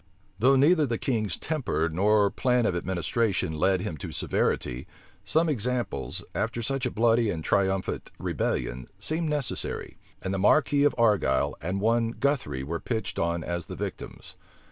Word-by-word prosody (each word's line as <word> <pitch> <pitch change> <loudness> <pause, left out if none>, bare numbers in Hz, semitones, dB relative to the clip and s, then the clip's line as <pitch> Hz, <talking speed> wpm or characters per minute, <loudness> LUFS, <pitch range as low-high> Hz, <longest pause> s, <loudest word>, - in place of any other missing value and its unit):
Though 130 +5 +5
neither 150 +3 +4
the 115 -2 -1
king's 110 -6 -1
temper 135 - -1
nor 100 +5 +3
plan 125 -2 +1
of 90 - +1
administration 95 +1 -1
led 95 +1 +2
him 90 -6 -4
to - - -6
severity, 60 +1 -1 0.4
some 160 +10 +2
examples, 125 - -2
after 115 +1 -2
such 135 +1 -1
a - - -1
bloody 115 0 +2
and 80 -5 -3
triumphant 95 0 0
rebellion, 60 +1 -2
seemed 160 0 -1
necessary; 150 -3 -1 0.2
and 95 - -3
the 95 - -1
marquis 145 +7 +4
of 145 - +3
Argyle 105 - +2
and 95 +3 -2
one 115 +1 +2
Guthry 140 - -1
were 85 +4 -3
pitched 110 -4 -3
on 85 0 0
as 85 0 -4
the - - -6
victims. - - -7
110 Hz, 155 wpm, -27 LUFS, 90-125 Hz, 0.4 s, Though